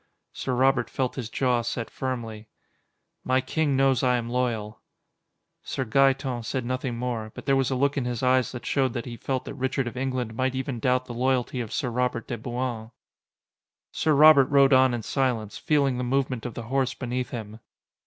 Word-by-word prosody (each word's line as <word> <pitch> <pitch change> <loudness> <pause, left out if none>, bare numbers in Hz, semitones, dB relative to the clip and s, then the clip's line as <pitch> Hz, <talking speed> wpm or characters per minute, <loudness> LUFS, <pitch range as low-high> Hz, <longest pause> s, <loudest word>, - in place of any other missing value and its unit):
Sir 130 - -2
Robert 130 -1 +2
felt 130 -2 -1
his 120 -5 -5
jaw 125 -1 +1
set 115 0 -4
firmly. 115 -5 -5 0.8
"My 130 0 +2
king 140 +1 0
knows 135 -2 +3
I 125 -1 +3
am 120 0 -4
loyal." 115 -4 -2 0.8
Sir 130 - -3
Gaeton 135 +1 +2
said 130 +2 -3
nothing 130 -1 -2
more, 115 -3 -3
but - - -9
there 135 -1 +3
was 135 -2 +1
a 135 - 0
look 140 +2 +1
in 135 - 0
his 125 0 -3
eyes 130 0 +3
that 125 - -8
showed 130 -4 +1
that 120 -2 -4
he 120 - -6
felt 130 +2 -3
that - - -6
Richard 130 -1 -1
of 120 - -6
England 130 -3 -2
might 130 +2 -1
even 130 -2 -3
doubt 125 +2 +1
the 120 - -7
loyalty 125 0 0
of 115 - -6
Sir 125 -5 -2
Robert 125 -1 -1
de 120 - -4
Bouain. 120 -1 -4 1.0
Sir 155 -2 +1
Robert 150 -2 +8
rode 140 0 +4
on 130 -1 +5
in 115 - -5
silence, 120 -6 -1
feeling 140 -4 +1
the - - -1
movement 130 -1 -1
of 120 - -9
the 120 - -5
horse 130 +2 -1
beneath 125 -1 -3
him. 110 -2 -7
125 Hz, 195 wpm, -26 LUFS, 120-135 Hz, 1.0 s, Robert